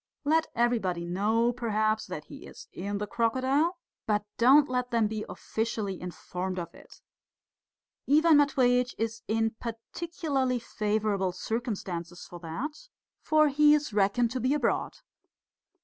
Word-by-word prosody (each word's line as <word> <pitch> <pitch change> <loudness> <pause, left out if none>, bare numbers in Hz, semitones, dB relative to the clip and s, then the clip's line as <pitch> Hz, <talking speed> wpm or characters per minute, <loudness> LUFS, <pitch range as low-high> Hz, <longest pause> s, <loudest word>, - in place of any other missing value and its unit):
Let 320 +2 +3
everybody 220 -8 +1
know, 220 +7 +1
perhaps, 215 -2 0
that - - -6
he - - -11
is - - -12
in 200 +2 -3
the 210 - -2
crocodile, 260 - +1 0.3
but 210 -1 +1
don't 270 +5 +6
let 250 -1 -1
them 230 -2 +2
be 215 0 -3
officially 220 -4 -3
informed 180 +1 -5
of 170 -2 -5
it. - - -17 1.1
Ivan 310 +2 +6
Matveitch 250 -4 +3
is 225 0 -3
in 225 0 +1
particularly 260 +2 -2
favourable 210 -4 -1
circumstances 185 -5 -4
for 175 - -10
that, 265 - -6 0.3
for 305 -1 +4
he 295 +1 +5
is 295 -6 -2
reckoned 210 +4 +2
to 255 - -2
be 255 +4 +1
abroad. 295 - 0
230 Hz, 135 wpm, -28 LUFS, 205-265 Hz, 1.1 s, don't